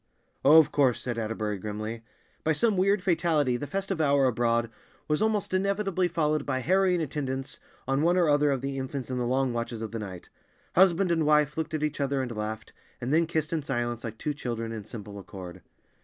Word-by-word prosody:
"Oh, 150 +3 +8
of 155 -2 +6
course," 130 -5 +3
said 120 -2 -3
Atterbury 110 -2 -2
grimly. 110 +3 -5 0.4
By 160 - +2
some 220 +6 +2
weird 195 +1 +2
fatality 160 -7 +2
the 135 +4 -4
festive 195 +2 -2
hour 140 -2 +4
abroad 115 -2 +1 0.4
was 150 0 +1
almost 215 -3 0
inevitably 195 -1 +1
followed 155 -3 0
by 130 -2 -1
harrowing 180 +2 +2
attendance 135 -2 -4 0.3
on 135 +1 +1
one 175 +3 +3
or 175 -3 +4
other 145 0 +4
of 135 -3 0
the 135 0 -3
infants 130 0 -5
in 125 - -1
the 120 - -1
long 130 0 +1
watches 115 -1 -3
of 110 - -5
the 115 - -4
night. 95 -4 -8 0.4
Husband 185 0 +4
and 165 -2 +2
wife 150 -1 +3
looked 160 -1 -2
at 155 - -2
each 150 -1 -1
other 140 0 0
and 120 -3 -5
laughed, 110 +1 -5 0.3
and 125 +4 -2
then 165 +1 +3
kissed 160 -1 -1
in 160 - 0
silence, 120 -4 -2
like 115 -2 -6
two 150 +6 -2
children, 115 -5 -4
in 110 -3 -6
simple 105 -2 -8
accord. 95 -2 -9
140 Hz, 205 wpm, -28 LUFS, 115-160 Hz, 0.4 s, Oh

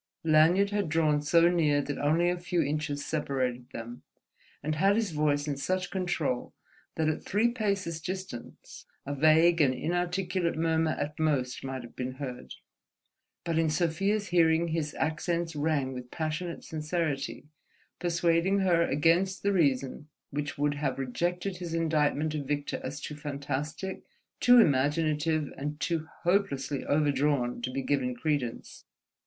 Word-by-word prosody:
Lanyard 165 +6 +4
had 205 -5 0
drawn 155 -2 +2
so 165 +3 +4
near 160 -5 +3
that 145 0 -3
only 160 +4 +2
a 180 - -3
few 175 -1 0
inches 145 0 -2
separated 130 -5 -2
them, 120 -1 -8 0.6
and 155 +2 -1
had 195 +6 +3
his 220 -4 0
voice 150 -1 +1
in 145 -2 -2
such 185 +5 -2
control 175 -9 -2 0.4
that 160 -1 0
at 155 - 0
three 215 +4 +2
paces' 200 -8 -2
distance 185 -8 -7 0.2
a 145 - -3
vague 160 +3 +5
and 130 -3 +3
inarticulate 175 +1 -1
murmur 160 -1 +1
at 150 +1 -4
most 140 -5 0
might 130 -1 -4
have 120 - -12
been 130 0 -4
heard; 130 -2 -7 0.9
but 165 -1 0
in 165 -1 +2
Sofia's 190 +6 0
hearing 165 -1 +3
his 155 -2 -2
accents 165 +1 -1
rang 145 -3 0
with 125 -1 -8
passionate 160 +3 -4
sincerity, 155 -3 -3 0.5
persuading 175 +2 +2
her 175 -3 +3
against 170 +5 +2
the 200 0 +2
reason 140 -4 +1 0.2
which 145 0 -3
would 145 0 +1
have 145 -2 -2
rejected 175 +8 -2
his 170 -2 -4
indictment 155 -2 +1
of 145 -3 -4
Victor 145 0 -2
as 135 +2 -5
too 150 - -6
fantastic, 145 +5 -4 0.4
too 245 0 +7
imaginative, 150 - +2
and 150 +2 -4
too 165 -2 -1 0.2
hopelessly 170 -7 0
overdrawn 145 -4 +1
to 125 - -2
be 135 +1 -3
given 130 -3 0
credence. 135 -3 -3
155 Hz, 145 wpm, -29 LUFS, 145-175 Hz, 0.9 s, too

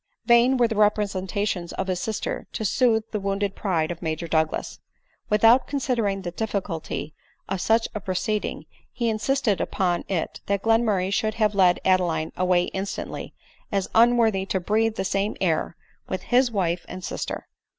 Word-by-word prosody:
Vain 240 +2 +5
were 240 -1 +4
the 225 - -3
representations 200 -3 0
of 190 - -2
his 185 -2 -2
sister 220 +2 -3
to 220 - -3
sooth 225 0 +2
the 210 - -1
wounded 200 0 -1
pride 170 -5 0
of 170 - -7
Major 160 0 -3
Douglas. 160 -1 -1 0.5
Without 225 +4 +5
considering 235 -8 -1
the 175 - -4
difficulty 190 -6 -4 0.3
of 190 -1 -2
such 225 +1 +2
a 210 - -3
proceeding, 200 +2 -2 0.3
he 235 -2 -1
insisted 225 -1 0
upon 175 -2 0
it 180 -5 -3
that 200 -1 0
Glenmurray 220 -5 +2
should 215 +1 0
have 215 -2 +2
led 185 -3 +4
Adeline 175 -4 +2
away 180 -1 +2
instantly, 195 +1 -5 0.4
as 195 -2 -1
unworthy 230 -4 +4
to 190 - 0
breathe 220 +4 +1
the 190 - -2
same 200 +2 -1
air 165 -2 0 0.3
with 185 - -3
his 250 +1 +3
wife 180 -5 -1
and 185 0 -7
sister. - - -4
200 Hz, 160 wpm, -24 LUFS, 185-225 Hz, 0.5 s, Vain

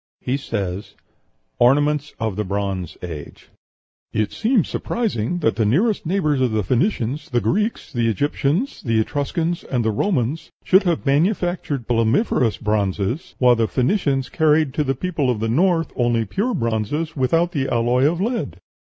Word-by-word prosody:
He 125 - -1
says, 100 -7 -4 0.6
ORNAMENTS 145 +3 +2
OF 110 -4 -2
THE 105 - -1
BRONZE 100 -3 -3
AGE 80 -5 -8 0.6
"It 110 -1 -1
seems 225 - +1
surprising 175 - -2
that 115 - +2
the 115 - +2
nearest 175 - +1
neighbors 155 -7 +1
of 125 -3 +1
the 110 -1 +1
Phoenicians 135 - -1
the 120 - +1
Greeks, 190 - -1
the 120 -2 +1
Egyptians, 145 - -1
the 115 -2 +1
Etruscans, 160 - -1
and 120 -4 -2
the 110 - +2
Romans 140 - -1
should 190 +1 +5
have 165 - -1
manufactured 155 - 0
plumbiferous 115 - +2
bronzes, 105 - -1
while 125 -1 +5
the 115 -1 +1
Phoenicians 135 - 0
carried 155 -3 +2
to 150 - 0
the 135 -1 -1
people 160 -3 -1
of 120 -4 0
the 110 - -1
North 165 +4 +2
only 120 -2 +1
pure 215 - -1
bronzes 115 +8 -2
without 165 +6 +1
the 140 -6 -1
alloy 120 +3 +2
of 170 - -4
lead. 230 +4 -2
135 Hz, 155 wpm, -21 LUFS, 115-165 Hz, 0.6 s, should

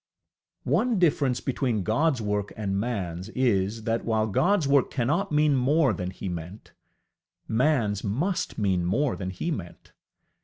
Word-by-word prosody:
One 215 - +2
difference 145 -7 +2
between 125 -6 -1
GodŌĆÖs 130 - +1
work 105 -1 -2
and 100 -3 -2
manŌĆÖs 100 -4 -3
is, 110 -3 +1
that, 115 +1 -1
while 110 -1 +1
GodŌĆÖs 180 - +2
work 140 -1 +3
cannot 150 +10 0
mean 150 -1 +3
more 135 0 +3
than 90 0 -4
he 95 +1 -7
meant, 90 +3 -7 0.7
manŌĆÖs 115 -5 +1
must 160 - -1
mean 95 -4 +1
more 120 +10 +1
than 95 -2 -4
he 95 - -3
meant. 90 - -7
115 Hz, 145 wpm, -26 LUFS, 100-145 Hz, 0.7 s, work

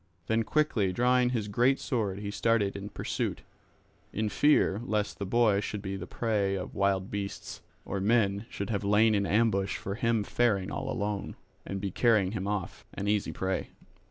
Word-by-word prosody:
Then 110 +3 +1
quickly 115 -7 +1
drawing 125 +4 +3
his 115 -4 -1
great 120 +6 +2
sword 105 -6 -1
he 100 -1 -4
started 110 -2 +1
in 100 0 -6
pursuit, - - -3 0.7
in 110 0 -1
fear 110 -4 +3
lest 105 -4 -1
the 100 - -3
boy 110 -2 +3
should 105 0 -4
be 95 -1 -3
the 90 -2 -6
prey 105 -4 0
of 95 - -5
wild 100 -1 0
beasts, 100 -1 -5 0.2
or 100 - -3
men 105 0 +2
should 100 +2 -4
have 100 -2 -1
lain 105 +2 +4
in 100 -1 +1
ambush 105 -3 +2
for 100 - -4
him 115 0 +1
faring 105 -4 +1
all - - -3
alone, 100 -1 -3 0.3
and 95 - -3
be 100 -1 -3
carrying 105 -4 +3
him 100 -2 -3
off, 100 -4 -3
an 100 - -3
easy 105 -1 +1
prey. 95 0 -2
105 Hz, 180 wpm, -29 LUFS, 100-115 Hz, 0.7 s, lain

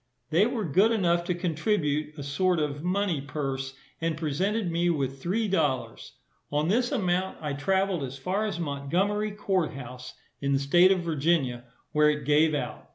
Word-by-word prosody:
They 180 +7 +4
were 235 -4 -2
good 190 +9 +4
enough 175 -6 +2
to 180 - 0
contribute 155 -3 -1
a 145 - -5
sort 175 +6 +1
of 145 -1 -2
money 180 -4 0
purse, 135 -2 -4 0.3
and 165 -1 -1
presented 180 +6 -1
me 170 +1 +1
with 135 -4 -1
three 210 +7 0
dollars. 150 -9 -1 0.4
On 150 +3 +1
this 245 +5 +2
amount 190 -6 0
I 150 -2 -3
travelled 190 +4 0
as 135 0 -5
far 190 +10 -1
as 190 -5 -4
Montgomery 175 +8 0
court 195 -5 -1
house, 125 -1 -9 0.3
in 140 0 +1
the - - +4
state 175 +7 +5
of 190 -2 +2
Virginia, 150 -6 0 0.3
where 150 0 +4
it 150 -2 -1
gave 150 +2 +4
out. 145 - -4
165 Hz, 170 wpm, -27 LUFS, 140-190 Hz, 0.4 s, state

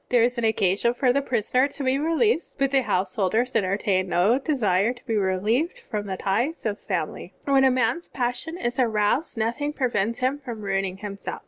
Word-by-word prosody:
There 245 -2 +4
is 245 +1 +1
an - - -3
occasion 220 +2 +2
for 250 -1 +2
the 280 - +2
prisoner 255 +1 +1
to 285 0 -7
be 260 +1 +1
released, 330 +5 +1
but 275 0 0
householders 220 0 +1
enter 195 -3 +1
tain 190 -3 0
no 200 +9 +3
desire 230 - +1
to 245 0 -17
be 230 - -2
reUeved 215 - 0
from 210 - -5
the 190 -1 -3
ties 235 - -1
of 210 -1 -1
family. - - -4
When 275 -1 +4
a 265 - +6
man's 255 +6 0
passion 250 +6 -3
is 240 -4 -2
aroused 225 +4 +1
noth 230 +5 -1
ing 295 +1 -1
prevents 235 -5 0
him 260 +3 0
from 235 -6 -7
ruining 195 -1 -1
himself. 200 -1 -6
240 Hz, 195 wpm, -24 LUFS, 205-270 Hz, -, a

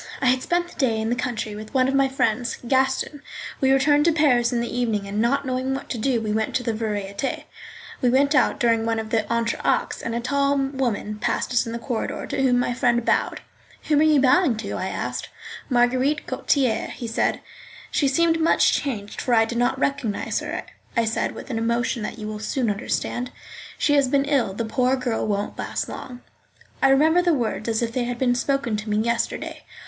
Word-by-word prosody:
I - - -1
had 255 0 +3
spent 350 +3 0
the - - -16
day 235 -6 +2
in 220 +1 -1
the - - +2
country 230 -3 -3
with 215 +5 -9
one 255 -1 +4
of 270 - 0
my 275 0 +4
friends, 240 -2 0
Gaston 265 +3 +1
R—. - - -19 0.4
We 265 0 +4
returned 290 +2 +4
to 335 - +5
Paris 270 -7 +3
in 240 - 0
the 235 0 -3
evening, 225 -5 0
and 205 +2 -1
not 275 +4 +1
knowing 260 +1 -1
what 270 - -7
to 235 - -3
do 250 +1 +1
we 215 -1 -3
went 220 0 -1
to 250 - +1
the 230 -2 -1
Variétés. 210 +1 -3 0.6
We 250 - +3
went 280 +4 +3
out 295 - +3
during 230 -3 +2
one 225 0 +1
of 220 -1 -4
the 220 -2 +1
entr'actes, 235 0 0
and 230 - -3
a - - 0
tall 280 +3 +1
woman 260 -6 -2
passed - - -1
us 245 0 +2
in - - -4
the 235 - -3
corridor, 235 0 -3
to - - -2
whom 255 -2 +3
my 245 0 +1
friend 240 -1 +1
bowed. - - +1 0.5
"Whom 300 -2 +4
are 310 +1 +5
you 300 -2 +5
bowing 265 -1 +4
to?" 220 - -5
I - - -2
asked. - - -4 0.4
"Marguerite 255 +4 +2
Gautier," 255 -6 0
he 240 - -7
said. 225 - 0 0.5
"She 285 - +2
seems 330 +4 +2
much 325 - +4
changed, 215 -8 -3
for 245 - +2
I 225 0 +5
did 235 +1 -3
not 245 +2 +1
recognise 265 -6 -1
her," - - -4 0.3
I 230 - +3
said, 225 - -1
with - - -8
an 225 - -1
emotion 235 +1 0
that 210 - -5
you 215 - -6
will 215 0 -5
soon 230 +1 -1
understand. 240 +3 -2 0.5
"She 290 - +2
has 280 -2 +4
been 275 +2 +2
ill; 270 -9 +1
the 230 - -2
poor 250 +3 +1
girl 250 -4 -2
won't 205 0 -2
last - - -3
long." 250 -1 -8 0.6
I 270 - +5
remember 315 +6 +5
the 350 -3 +2
words 230 -3 -2
as 225 +1 0
if 230 - -1
they 245 -1 0
had 245 0 -3
been 245 -1 +2
spoken 250 -2 0
to 215 +1 -6
me 210 - +1
yesterday. 235 +2 -1
245 Hz, 220 wpm, -23 LUFS, 225-275 Hz, 0.6 s, to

